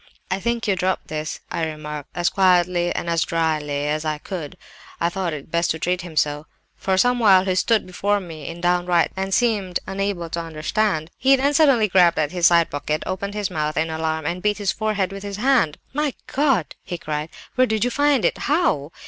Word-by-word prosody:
"'I 185 - 0
think 235 +2 -1
you 200 - +2
dropped 185 +1 -1
this,' 155 0 -4
I 165 - -2
remarked, 150 -2 -5
as 175 0 +1
quietly 180 -2 +3
and - - -3 0.2
drily 155 -4 -1
as 155 +1 -1
I 155 -1 -1
could. 175 +1 -7 0.4
(I 170 - +1
thought 180 -1 -2
it 150 0 -8
best 170 +1 +1
to 160 - 0
treat 180 +3 -1
him 170 -2 -9
so.) 150 +1 0 0.3
For 190 -1 -1
some 245 +5 +3
while 190 -4 +5
he 190 - +1
stood 220 +4 +2
before 200 +3 0
me 165 -5 -9
in 170 +1 -7
downright 175 -1 +2
terror, 190 0 -2
and 195 - -7
seemed 200 -5 +1
unable 195 -3 -2
to 170 - -2
understand. 160 +2 -1
He 270 +2 +5
then 275 +2 +1
suddenly 275 -8 +4
grabbed 180 -3 +4
at 150 -1 0
his 175 -2 +4
side 170 -1 +3
pocket, 150 +1 -2
opened 200 +2 -4
his 210 -2 -2
mouth 155 0 -2
in 160 0 0
alarm, 160 -1 -2
and 175 +4 -2
beat 210 +1 +1
his 205 -2 0
forehead 210 -3 -1
with 195 0 -7
his 200 0 -6
hand. 235 - +2 0.2
"'My 295 -1 -1
God!' 270 - +1
he 175 - -6
cried, 150 -1 -4 0.2
'where 255 0 +3
did 220 -1 0
you 245 - 0
find 285 -2 +2
it? - - +2
How? 290 - +1
180 Hz, 210 wpm, -22 LUFS, 160-205 Hz, 0.4 s, while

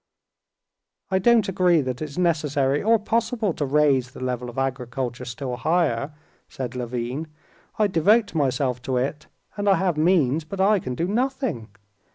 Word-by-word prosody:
"I 190 - +3
don't 230 0 +4
agree 180 -3 +3
that 130 -2 -4
it's 155 0 -6
necessary 150 -5 +1
or 225 +2 +4
possible 225 -2 -1
to 150 - -2
raise 140 -3 +2
the - - -12
level 125 -1 -3
of 120 - -11
agriculture 125 -1 -3
still 125 +1 -5
higher," 155 -4 0 0.4
said 130 -1 -6
Levin. 125 +4 -4 0.5
"I 215 - +3
devote 205 +4 +3
myself 130 -4 0
to 130 0 -2
it, 140 +4 -2 0.3
and 205 0 +1
I 195 - +6
have 185 -5 0
means, 155 -3 +2
but 190 +5 -8
I 200 +2 +4
can 125 -6 -5
do 170 +7 -1
nothing. 245 - -1
150 Hz, 160 wpm, -24 LUFS, 125-190 Hz, 0.5 s, I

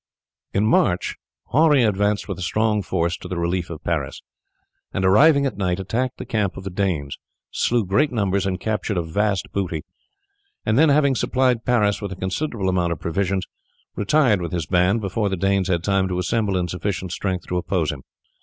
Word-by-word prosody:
In 100 +2 +1
March 100 -4 +2 0.4
Henri 150 -2 +5
advanced 105 -1 +1
with 100 -2 -5
a - - -7
strong 105 +3 +1
force 85 -2 -1
to - - -9
the 90 0 -4
relief 85 +1 -1
of 80 -2 -8
Paris, 75 -6 -2 0.7
and 95 - -1
arriving 140 +9 +5
at 135 - -2
night 90 -1 0
attacked 120 +7 -2
the - - -7
camp 105 -4 -1
of 95 - -7
the 95 - -5
Danes, 90 -7 -2 0.3
slew 120 -3 +1
great 140 +11 +2
numbers, 100 -4 0
and 95 -1 -2
captured 105 -2 -2
a 85 - 0
vast 100 +5 -1
booty; 85 -6 -2 0.8
and 110 - +2
then, 155 +4 +5
having 140 -1 +4
supplied 125 -2 +1
Paris 105 -5 +2
with 100 -2 -4
a - - -4
considerable 95 +3 -2
amount 90 -2 +1
of 80 - -9
provisions, 95 +2 -1 0.5
retired 110 -2 +2
with 85 -1 -4
his 85 -3 -1
band 90 +6 +2
before 100 +1 -1
the 95 - -2
Danes 95 0 +1
had 85 -2 0
time 95 -1 +1
to 90 -1 -2
assemble 95 +2 0
in 90 -1 -1
sufficient 90 0 -3
strength 95 -1 -3
to 90 - -2
oppose 90 -3 0
him. 70 -3 -8
95 Hz, 190 wpm, -22 LUFS, 90-110 Hz, 0.8 s, Henri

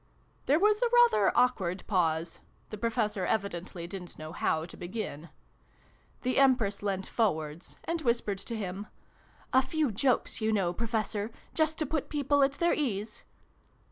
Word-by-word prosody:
There 285 - +5
was 420 +3 +3
a 485 - +3
rather 480 - +5
awkward 200 -8 +2
pause: 165 -4 0
' - - -36
the 215 - -5
Professor 220 -3 0
evidently 180 -4 -2
didn't 180 0 -8
know 155 0 -7
how 160 0 0
to 175 - -11
begin. 175 -4 -5 0.9
The 255 +1 +2
Empress 245 -7 +3
leant 195 -2 -1
forwards, 160 -7 -2
and 335 -1 -2
whispered 235 -6 0
to 230 +4 -5
him. 200 0 -5 0.7
"A 260 - +7
few 285 0 0
jokes, 240 +2 +1
you 220 0 +2
know, 190 -5 +1
Professor 220 -1 -2 0.2
just 315 -1 +1
to 310 - 0
put 300 0 -2
people 285 -1 +2
at 275 0 +4
their 340 +4 +2
ease 215 -7 -2
215 Hz, 155 wpm, -30 LUFS, 185-270 Hz, 0.9 s, A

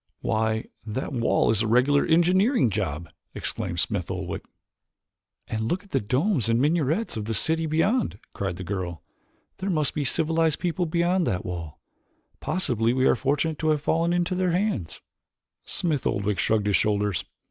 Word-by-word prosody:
"Why, 110 0 0 0.2
that 110 +6 -4
wall 115 -3 +2
is 110 -1 +1
a 110 - 0
regular 130 +5 +4
engineering 180 - +3
job," 85 -5 -2 0.3
exclaimed - - -2
Smith - - 0
Oldwick. - - -4 1.0
"And 110 0 -2
look 185 +3 -1
at 200 - -21
the - - +2
domes 130 - +1
and 115 +1 +3
minarets 155 - +1
of 105 - -3
the 110 0 -1
city 160 +7 +2
beyond," 165 - +1 0.2
cried 95 -3 -3
the 95 - -7
girl. 90 -3 -4 0.5
"There 190 +1 -3
must 155 -6 +1
be 150 - -2
a - - -2
civilized 160 +2 +2
people 175 0 -1
beyond 175 +2 +1
that 90 - -1
wall. 85 -4 -6 0.6
Possibly 120 - 0
we 130 0 +2
are - - +5
fortunate 145 +5 0
to 160 - +1
have 150 -2 +2
fallen 165 +3 +1
into 175 +1 0
their 185 -1 +1
hands." 180 - -1 0.6
Smith 155 -7 -1
Oldwick 100 0 -1
shrugged 110 -2 +1
his 105 -1 +2
shoulders. 105 -3 +1
140 Hz, 170 wpm, -25 LUFS, 110-170 Hz, 1.0 s, are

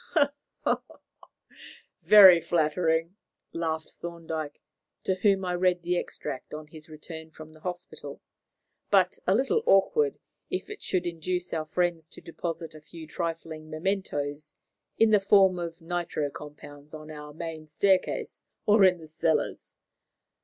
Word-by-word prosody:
"Very 190 -5 +9
flattering," 165 +2 +1 0.4
laughed 160 -1 -3
Thorndyke, 160 -3 -5 0.4
to 190 - +1
whom 195 0 +2
I 180 - -1
read 180 0 +1
the 175 +1 0
extract 150 -4 -5
on 155 0 -7
his 155 +1 -12
return 160 +1 -9
from 155 0 -12
the 155 - -16
hospital, 180 +2 -7 0.7
"but 485 - +3
a - - +4
little 435 +13 +2
awkward 430 - +4 0.3
if - - -4
it 420 - -8
should 180 -1 -1
induce 180 +2 -3
our 160 -1 -1
friends 170 -1 -1
to - - -13
deposit 165 -1 -5
a 155 - -12
few 160 +1 -11
trifling 160 -1 -5
mementoes 155 -4 -3 0.4
in 225 -1 +5
the 210 - +6
form 195 -2 +5
of 170 -1 -5
nitro 165 -4 -2
compounds 145 0 -11
on 155 0 -9
our 150 -1 -9
main 160 0 -7
staircase 190 +5 0 0.2
or 210 -1 +5
in 185 -1 +6
the 160 -2 -12
cellars. 155 0 -1
165 Hz, 135 wpm, -28 LUFS, 155-180 Hz, 0.7 s, Very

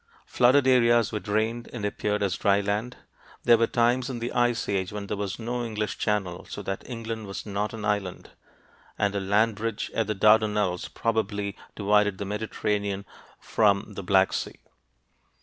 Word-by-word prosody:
Flooded 130 +3 +4
areas 120 -3 +4
were 105 - -2
drained 110 +3 -1
and 110 -4 -4
appeared 105 0 -1
as 95 -3 0
dry 100 0 +3
land. 105 +5 -2 0.5
There 120 -1 +6
were 115 - +3
times 125 +2 +1
in 130 - -4
the 120 +1 -3
Ice 120 -1 +1
Age 95 -2 -1
when 105 -1 -5
there 100 - -3
was 100 0 -3
no 120 +1 -3
English 110 -2 -3
Channel, 95 -5 -1
so - - -6
that 95 0 -3
England 115 -3 -5
was 95 - -6
not 105 0 -2
an 110 -2 -6
island, 100 -3 -2 0.7
and 100 -1 +1
a 100 - -1
land 105 +3 +2
bridge 115 0 -3
at 115 -2 0
the 110 - -1
Dardanelles 105 -3 +3
probably 105 -3 -1 0.2
divided 105 -1 +2
the 100 - -4
Mediterranean 105 -1 -2 0.3
from 105 -1 +1
the 100 - -5
Black 95 0 +3
Sea. - - -4
105 Hz, 170 wpm, -26 LUFS, 100-115 Hz, 0.7 s, There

